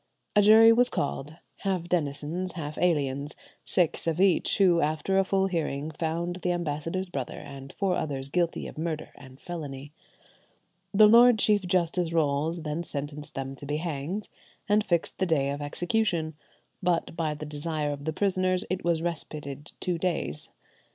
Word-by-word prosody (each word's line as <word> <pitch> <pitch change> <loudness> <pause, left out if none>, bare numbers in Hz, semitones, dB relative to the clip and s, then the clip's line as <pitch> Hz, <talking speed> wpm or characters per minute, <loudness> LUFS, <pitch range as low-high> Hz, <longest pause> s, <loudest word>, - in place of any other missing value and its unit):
A 210 - +7
jury 220 +2 +8
was 245 +2 +5
called, 145 +1 -3 0.2
half 190 -4 -1
denizens, 165 +2 -1
half 155 -3 -5
aliens, 145 -4 0 0.3
six 175 -2 +1
of 165 +1 0
each, 190 -2 +3
who, 180 -4 +4
after 155 +6 +1
a - - +4
full 195 0 +1
hearing, 160 -5 -2
found 170 +3 -2
the 180 -1 -1
ambassador's 170 +2 -2
brother 135 -5 -4
and 135 -1 -9
four 195 -2 0
others 140 -4 -3
guilty 170 +2 0
of - - -8
murder 160 -1 -3
and 130 -1 -14
felony. 145 -5 -7 1.0
Lord 225 +3 +7
Chief 210 0 +3
Justice 175 -1 +1
Rolles 160 +1 0
then 155 +1 -2
sentenced 145 -2 -5
them 135 0 -4
to 145 - -9
be 150 +1 -1
hanged, 165 +5 -4 0.4
and 210 +1 +3
fixed 170 -5 0
the 190 - +1
day 140 -4 +1
of 145 +1 -4
execution; 170 +1 0 0.5
but 175 -2 0
by 160 -3 -1
the 155 - -7
desire 150 0 -2
of 145 0 -6
the 160 - 0
prisoners 185 -1 +1
it 185 - -2
was 165 -1 +1
respited 150 -3 -3
two 180 -3 -1
days. 165 - -2
165 Hz, 160 wpm, -27 LUFS, 145-185 Hz, 1.0 s, jury